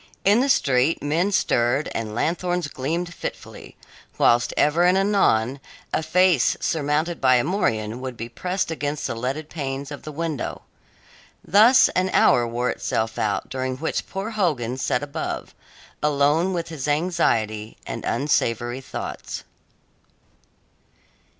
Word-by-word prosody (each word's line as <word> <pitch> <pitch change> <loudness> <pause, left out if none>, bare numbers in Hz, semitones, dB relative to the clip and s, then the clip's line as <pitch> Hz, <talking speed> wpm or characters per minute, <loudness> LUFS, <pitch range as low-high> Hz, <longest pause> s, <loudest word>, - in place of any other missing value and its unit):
In 205 +4 +5
the 270 +2 +1
street 135 - +2
men 165 +7 +1
stirred 125 -5 +1
and 110 -2 -4
lanthorns 175 +3 -1
gleamed 160 +6 -3
fitfully, - - -8 0.4
whilst 120 0 +3
ever 155 +4 +3
and 180 +1 +4
anon 140 - +2 0.3
a - - +1
face 170 -2 +3
surmounted 155 +2 -1
by 130 -2 +5
a 120 - +3
morion 115 - -1
would 130 -2 -6
be 115 - -5
pressed 180 +8 -3
against 150 -2 -3
the - - -2
leaded 130 +6 -3
panes 140 -3 -5
of 145 - -7
the 155 - -8
window. 155 -3 -4 0.8
Thus 220 +7 +6
an 185 +1 0
hour 120 -1 +4
wore 120 +2 -1
itself 110 0 -2
out 105 -2 -1
during 130 -1 -3
which 160 +4 -3
poor 195 +4 -4
Hogan 150 - 0
sat 130 0 0
above, 145 -1 -5 0.5
alone 150 +4 +2
with 170 -2 -3
his 150 -4 -5
anxiety 115 -10 0
and - - -5
unsavoury 120 -3 0
thoughts. - - -6
145 Hz, 135 wpm, -23 LUFS, 125-175 Hz, 0.8 s, Thus